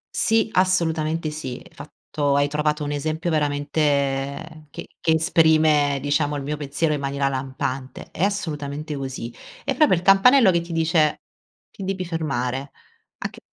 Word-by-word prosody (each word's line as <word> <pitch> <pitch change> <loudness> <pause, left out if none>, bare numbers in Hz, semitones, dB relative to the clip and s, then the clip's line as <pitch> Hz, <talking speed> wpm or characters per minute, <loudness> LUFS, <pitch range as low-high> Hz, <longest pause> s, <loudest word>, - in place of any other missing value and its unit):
Sì, 225 0 +2
assolutamente 165 -4 +1
sì, 135 -5 -6
fatto 145 -1 -3
hai 145 0 +3
trovato 150 +1 -1
un 145 - -3
esempio 155 +4 -2
veramente 145 0 -1
che - - -8
che 160 - +1
esprime 155 -3 +3
diciamo 145 +1 0
il 140 - -5
mio 150 +2 -2
pensiero 150 +2 -1
in 145 - -2
maniera 140 0 -1
lampante. 130 0 -5
È 165 - -3
assolutamente 155 -7 -3
così. 130 -4 -5 0.3
È - - -1
proprio 305 -11 +4
il 170 - -4
campanello 195 +4 +6
che 170 -1 +1
ti 170 - -9
dice: 160 -2 +1 0.5
“Ti - - -9
devi 190 -1 -3
fermare.” 135 -5 -3 0.5
a - - -4
c - - -14
150 Hz, 150 wpm, -23 LUFS, 140-165 Hz, 0.5 s, campanello